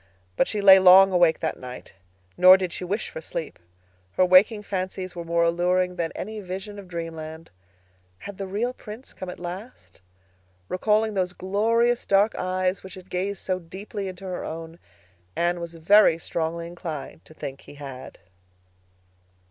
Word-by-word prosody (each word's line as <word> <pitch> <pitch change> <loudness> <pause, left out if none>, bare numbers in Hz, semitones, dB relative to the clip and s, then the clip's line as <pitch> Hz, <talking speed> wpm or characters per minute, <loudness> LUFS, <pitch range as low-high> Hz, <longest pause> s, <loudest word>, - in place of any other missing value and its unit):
But - - +2
she 210 - -2
lay 190 -1 +9
long 190 +1 +8
awake 175 -3 +3
that 160 - -2
night, 125 0 -9 0.4
nor 185 - +8
did 185 -2 -3
she - - -5
wish 200 +5 -3
for - - -7
sleep. 165 0 -6 0.5
Her 185 - +3
waking 205 +4 +5
fancies 185 -2 -4
were 170 - -5
more 170 0 +1
alluring 180 +2 +1
than 170 -2 -2
any 215 +2 -6
vision 195 +2 -7
of 195 - -11
dreamland. 165 -2 -7 0.7
Had 200 - -10
the 195 - -4
real 220 +6 -2
Prince 225 +2 -11
come 185 - -7
at - - -8
last? 185 - -9 0.7
Recalling 215 +3 +1
those 185 -2 -1
glorious 230 +6 +1
dark 200 +2 +3
eyes 185 +1 -1
which 190 - -10
had 185 0 -14
gazed 190 +2 -2
so 185 -1 -1
deeply 195 +4 -7
into 185 +1 -8
her 180 -1 -4
own, 165 +1 -7 0.6
Anne 175 +1 0
was 170 0 -7
very 165 +1 +5
strongly 165 0 -3
inclined 170 -4 -7
to 155 - -16
think 135 -2 -7
he - - -14
had. 135 -3 -9
185 Hz, 165 wpm, -25 LUFS, 170-200 Hz, 0.7 s, lay